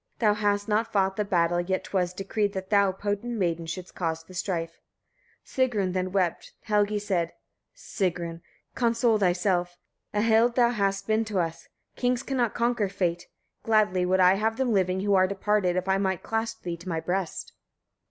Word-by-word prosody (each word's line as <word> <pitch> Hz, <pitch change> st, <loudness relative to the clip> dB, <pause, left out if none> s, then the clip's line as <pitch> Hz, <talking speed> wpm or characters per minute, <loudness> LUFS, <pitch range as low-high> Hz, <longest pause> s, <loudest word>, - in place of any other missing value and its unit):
Thou 215 Hz, -3 st, +3 dB
hast 205 Hz, 0 st, 0 dB
not 220 Hz, +1 st, 0 dB
fought 190 Hz, -1 st, +1 dB
the 210 Hz, -, 0 dB
battle, 175 Hz, -3 st, +1 dB
yet 185 Hz, +1 st, -2 dB
'twas 180 Hz, -2 st, -1 dB
decreed, 200 Hz, +2 st, -2 dB
that 190 Hz, +1 st, -6 dB
thou, 200 Hz, -2 st, +4 dB
potent 205 Hz, +5 st, -3 dB
maiden! 170 Hz, -4 st, -1 dB
shouldst 180 Hz, +2 st, -6 dB
cause 165 Hz, -2 st, -3 dB
the 185 Hz, -, -15 dB
strife. 170 Hz, -2 st, -3 dB, 0.7 s
Sigrun 220 Hz, -9 st, 0 dB
then 185 Hz, 0 st, -1 dB
wept. 185 Hz, -3 st, -1 dB
Helgi 210 Hz, 0 st, +1 dB
said: 185 Hz, -5 st, -1 dB, 0.4 s
27. -, -, -51 dB
Sigrun! 175 Hz, -, -3 dB, 0.3 s
console 230 Hz, -2 st, +2 dB
thyself; 180 Hz, -1 st, +1 dB, 0.3 s
a 210 Hz, -, 0 dB
Hild 230 Hz, +1 st, +4 dB
thou 240 Hz, -1 st, +4 dB
hast 195 Hz, -3 st, -1 dB
been 220 Hz, +1 st, +2 dB
to 210 Hz, -3 st, -3 dB
us. 165 Hz, -2 st, -2 dB, 0.3 s
Kings 250 Hz, 0 st, 0 dB
cannot 250 Hz, -5 st, -1 dB
conquer 235 Hz, -4 st, +1 dB
fate: 175 Hz, -3 st, -2 dB, 0.3 s
gladly 210 Hz, -5 st, +2 dB
would 185 Hz, +1 st, +2 dB
I 185 Hz, 0 st, +6 dB
have 220 Hz, +2 st, 0 dB
them 255 Hz, -3 st, +1 dB
living 185 Hz, -1 st, +1 dB
who 200 Hz, 0 st, +1 dB
are 185 Hz, -1 st, +5 dB
departed, 200 Hz, -1 st, 0 dB
if 185 Hz, +1 st, -1 dB
I 190 Hz, 0 st, +2 dB
might 190 Hz, -2 st, -1 dB
clasp 225 Hz, 0 st, -3 dB
thee 175 Hz, -1 st, -4 dB
to 175 Hz, +2 st, -9 dB
my 165 Hz, -2 st, -1 dB
breast. 180 Hz, +1 st, -3 dB
195 Hz, 180 wpm, -27 LUFS, 180-215 Hz, 0.7 s, I